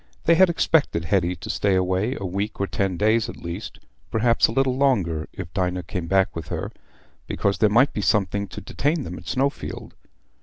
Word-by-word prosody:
They 165 - +5
had 185 +2 +6
expected 155 - +1
Hetty 90 -1 +1
to 85 - -9
stay 100 -2 +1
away 95 +7 0
a 100 - -4
week 100 +4 -3
or 100 - +1
ten 95 -2 -1
days 110 +2 +2
at - - -8
least, 85 +5 -7 0.3
perhaps 115 +1 +3
a - - -4
little 130 +1 +1
longer 95 - +1
if 90 -3 -8
Dinah 90 -1 -1
came 90 -3 -5
back 95 +1 +2
with 80 -2 -6
her, - - -4 0.6
because 100 0 -1
there 110 - +4
might 120 +7 +5
then - - -3
be - - 0
something 100 0 +1
to 90 - -8
detain 150 +2 -1
them - - -7
at - - -15
Snowfield. 135 +3 -2
100 Hz, 200 wpm, -23 LUFS, 90-125 Hz, 0.6 s, had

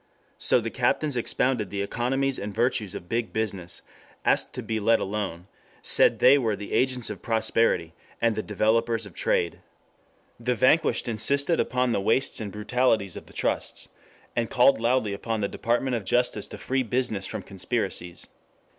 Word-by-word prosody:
So - - +4
the 115 -1 -4
captains 130 +3 +1
expounded 120 -2 0
the 100 +1 -2
economies 130 +5 -1
and 105 - -4
virtues 115 -4 0
of 85 - -8
big 115 +2 -2
business, 95 -6 -3 0.4
asked - - +2
to - - -4
be 110 -1 -2
let 115 +2 +3
alone, 95 -4 -3 0.4
said - - +4
they 135 +3 +6
were 110 -5 0
the 100 +1 -7
agents 125 -3 +1
of 105 - -8
prosperity, 110 -7 +1 0.3
and 115 -1 +2
the 110 - -2
developers 110 +2 +1
of 100 - -11
trade. 85 - 0 0.8
The 125 +1 0
vanquished 130 +4 +3
insisted 140 +8 +1
upon 125 -1 +1
the 100 - 0
wastes 115 +5 +2
and 105 -2 -5
brutalities 110 -3 +1
of - - -9
the - - -16
trusts, - - -2 0.5
and 115 -2 0
called 130 -1 +4
loudly 115 -3 +1
upon 110 +2 -3
the 100 - +1
Department 120 +4 -1
of 115 - -3
Justice 115 +1 0
to - - -9
free 135 0 -1
business 120 -4 -1
from 110 -3 -5
conspiracies. 95 -3 -3
115 Hz, 165 wpm, -26 LUFS, 105-125 Hz, 0.8 s, they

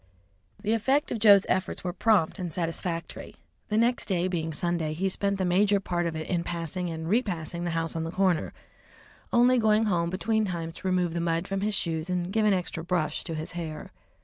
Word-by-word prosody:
The 215 - +1
effect 270 +7 +1
of 230 - -2
Joe's 205 -2 +7
efforts 185 0 -1
were 180 -1 -2
prompt 205 -3 +2
and 175 -2 -3
satisfactory. 165 0 -4 0.3
The 210 - +1
next 235 +2 +2
day 185 -2 +1
being 165 -3 -2
Sunday, 165 -1 -1
he 190 +5 0
spent 200 +1 0
the 190 - 0
major 200 +3 +3
part 175 -3 -1
of 165 - -4
it 155 0 -4
in 175 -2 0
passing 175 +1 -3
and 160 0 -5
repassing 175 -5 -1
the - - -1
house 165 0 -2
on 165 - -1
the 165 - -3
corner, 185 -1 +1 0.8
only 245 +1 +5
going 220 0 +3
home 170 -5 +1
between 220 +4 0
times 170 -4 -3
to - - -5
remove 180 -2 +1
the 170 - -1
mud 165 +1 0
from 195 0 -2
his 210 0 +1
shoes 165 -2 -1
and 180 +1 -2
give 220 -1 +2
an - - +4
extra 175 -2 -4
brush 165 -4 -1
to 165 - -4
his 155 +1 -5
hair. 165 -3 -6
180 Hz, 210 wpm, -27 LUFS, 165-200 Hz, 0.8 s, Joe's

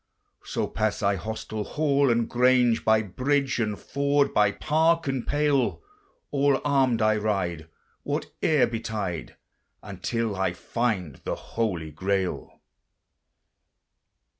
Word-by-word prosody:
So - - -2
pass 110 -1 -2
I 100 0 +3
hostel, 110 +3 -5
hall, 140 +1 +1
and 115 -1 +2
grange; 125 -1 +3
By 110 0 +3
bridge 135 +6 0
and 105 -3 -1
ford, 140 0 +1
by 105 -1 +4
park 160 +7 +1
and 135 -3 -2
pale, 145 - +1 0.5
All 140 -1 +2
armed 130 -5 +2
I 110 0 +3
ride, 95 -7 -2 0.3
whate'er 150 -6 0
betide, 110 -7 -4 0.5
Until 115 -3 -3
I 95 -2 0
find 95 - -2
the - - -4
holy 90 -9 -3
Grail. 95 +3 -2
115 Hz, 115 wpm, -26 LUFS, 100-140 Hz, 0.5 s, by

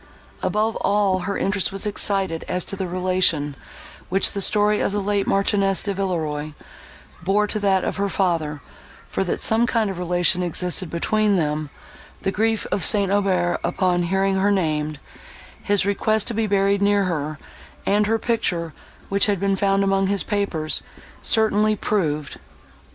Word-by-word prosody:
Above 215 +1 0
all, 200 -2 +1
her 200 +2 -3
interest 195 -1 0
was 195 +2 -3
excited 195 -5 -1
as 180 0 -2
to - - -2
the 190 -1 -3
relation, 180 -5 +1 0.6
which 195 +2 +3
the 200 - -3
story 210 +1 +3
of - - 0
the 205 - -1
late 200 0 -1
Marchioness 195 -1 +1
de 200 - -2
Villeroi 155 -6 -3 0.7
bore 195 +4 +2
to 215 +1 -2
that 195 -2 +2
of - - -3
her 200 0 0
father; 165 -7 -1 0.5
for, - - -2
that 180 - -2
some 225 +2 +4
kind 225 -4 0
of 185 - -7
relation 180 0 +2
existed 180 +1 -1
between 210 +4 +1
them, 150 -3 -1 0.5
the 195 - 0
grief 220 +2 0
of 195 - 0
St. 200 -3 +4
Aubert, 185 -4 +1
upon 180 -2 +1
hearing 190 +2 +1
her 195 +2 +2
named, 155 -6 -1 0.6
his 205 -2 +1
request 210 +1 +1
to 235 - -1
be 220 0 0
buried 200 0 +2
near 200 0 +3
her, 155 -4 -3 0.5
and 205 +1 +2
her 225 +1 +2
picture, 175 -8 -1 0.3
which 200 +1 +2
had 200 -3 0
been 195 0 +1
found 195 0 +1
among 195 0 +1
his 200 0 +1
papers, 200 -7 0 0.4
certainly 215 -1 +2
proved. 155 -9 -2
195 Hz, 160 wpm, -22 LUFS, 175-205 Hz, 0.7 s, some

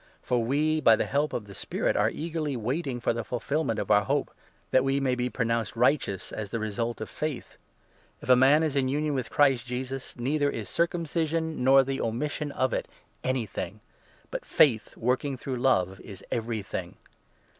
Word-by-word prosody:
For 125 - +1
5 115 - -1
we, 155 +4 +2
by 115 - +7
the - - -1
help 145 +2 0
of 110 - -3
the 100 - -11
Spirit, - - -1
are - - +3
eagerly 155 -4 -3
waiting 130 +3 -2
for 120 - +1
the 115 0 -3
ful 120 +2 -3
filment 140 -3 -1
of - - -2
our 105 0 +5
hope - - 0 0.2
— - - -35
that 130 - +4
we 135 +1 +1
may 135 -2 +1
be 125 0 -1
pronounced 115 -2 -1
righteous 115 -6 +1
as 110 -2 -5
the 115 - -2
result 115 +2 -3
of 110 - -3
faith. 150 -4 -5 0.6
If - - -11
a 130 - +7
man 135 +5 +5
is 155 -3 0
in 130 -2 +2
union 150 +2 0
with 130 -3 -2
Christ 135 -5 +3
Jesus, 130 +2 -3
6 - - -12
neither 145 +4 +1
is 110 -6 -4
circumcision 165 -3 -1
nor 135 +1 +7
the 135 0 -3
omission 145 +6 -2
of 130 -2 0
it - - -2 0.4
anything, 110 -6 -2 0.5
but - - -4
faith, 115 -7 +3
working 130 +3 0
through 130 0 -4
love, 95 -8 +2
is 100 -3 -10
everything. 110 -3 -3
130 Hz, 195 wpm, -27 LUFS, 115-145 Hz, 0.6 s, by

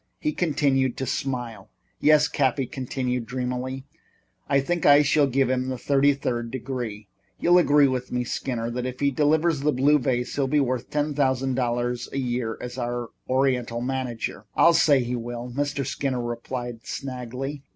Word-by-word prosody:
He 305 - 0
continued 140 -6 +1
to 130 - -2
smile. 125 -3 -4 0.3
"Yes," 150 0 +5
Cappy 135 -3 +1
continued 125 -1 -3
dreamily, 125 +1 -3 0.6
"I 140 - +4
think 170 +5 -1
I 145 +1 +7
shall 145 0 +3
give 135 0 +2
him 130 0 0
the 130 - -3
thirty 140 +2 +3
third 120 -4 -2
degree. 120 -5 -5 0.3
You'll 175 +1 +5
agree 145 -4 +5
with 130 -1 -3
me, 125 0 0
Skinner, 120 -1 -3
that 125 +1 -3
if 125 0 -6
he 140 0 +2
delivers 155 +3 +2
the 150 +2 +2
blue 145 +3 +3
vase 125 -1 -1
he'll 140 -2 +1
be 150 +2 +2
worth 130 -3 -1
ten 150 0 -1
thousand 135 -2 +1
dollars 120 -1 -1
a - - -4
year 120 -3 -2
as 125 +1 -6
our 120 -1 -3 0.2
Oriental 130 -3 +1
manager?" 125 -4 -3
"I'll 170 - +6
say 145 -5 +4
he 120 +1 -2
will," 120 +1 -5
Mr. 145 -1 -1
Skinner 130 0 -2
replied 120 0 -5
slangily. 130 +2 -5
130 Hz, 170 wpm, -25 LUFS, 120-140 Hz, 0.6 s, I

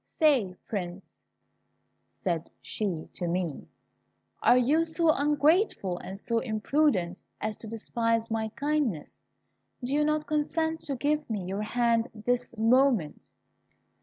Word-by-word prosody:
Say, 265 - +3
Prince," 185 -2 -5 1.0
said 170 -3 -1
she 185 -7 -3
to 175 - -3
me, 170 -3 -2 0.7
"are 250 - +6
you 285 +7 +3
so 330 0 +2
ungrateful 295 - +2
and 190 - -7
so 230 +3 0
imprudent 215 - +1 0.2
as 215 0 -2
to 225 - -10
despise 230 +1 -1
my 220 -1 -1
kindness? 285 - -1 0.6
Do 250 +3 -2
you 300 +1 +3
not 305 0 +1
consent 320 +2 0
to 280 - -1
give 295 +3 0
me 205 -5 -2
your 195 +3 -3
hand 235 +1 +1
this 245 +3 -1
moment?" 230 - +3
230 Hz, 125 wpm, -28 LUFS, 195-295 Hz, 1.0 s, are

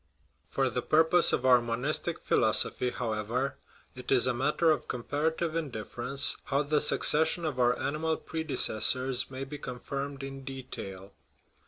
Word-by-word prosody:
For 135 -1 0
the 125 0 -2
purpose 160 +5 +4
of 125 - -1
our 125 -2 +6
monistic 120 +6 -2
philosophy, 125 - +2
however, 120 +3 -3 0.4
it 125 -1 -7
is 130 -3 +5
a 125 - +2
matter 150 +6 +2
of 155 - -1
comparative 155 +6 -2
indifference 135 -2 +1
how 140 +1 0
the 150 +1 +1
suc 150 - +2
cession 160 +2 +3
of 140 -5 -3
our 125 0 +3
animal 160 +2 -1
predecessors 130 -4 0
may 135 0 -6
be 145 +2 -8
confirmed 140 +2 -6
in 135 0 -8
detail. 100 -8 -8
135 Hz, 145 wpm, -29 LUFS, 125-150 Hz, 0.4 s, our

